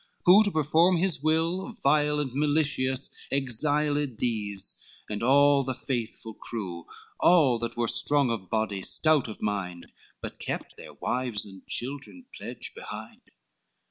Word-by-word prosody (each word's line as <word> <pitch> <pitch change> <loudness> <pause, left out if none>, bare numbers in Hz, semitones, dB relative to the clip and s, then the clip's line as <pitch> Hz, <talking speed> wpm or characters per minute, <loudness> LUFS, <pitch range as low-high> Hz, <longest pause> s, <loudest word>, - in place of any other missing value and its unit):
Who 195 +5 +8
to - - +2
perform 160 +2 +3
his 175 -5 +2
will, 165 +8 0
vile 150 +1 +3
and 135 -4 -2
malicious, 140 -2 0
Exiled 145 +1 +2
these, 105 -4 -4 0.2
and 105 -1 -4
all 140 +3 +4
the 130 -1 -3
faithful 115 -3 -4
crew, 90 -7 -6 0.3
All 145 -9 +4
that 115 0 -4
were 120 -1 0
strong 140 +1 +3
of 100 -6 -5
body, 110 -3 -1
stout 155 +5 +2
of 110 - -9
mind, 90 -4 -4 0.3
But - - -8
kept - - -5
their - - -12
wives 125 -5 -2
and 95 -2 -13
children 140 - -3
pledge - - -5
behind. - - -9
135 Hz, 140 wpm, -27 LUFS, 110-150 Hz, 0.3 s, Who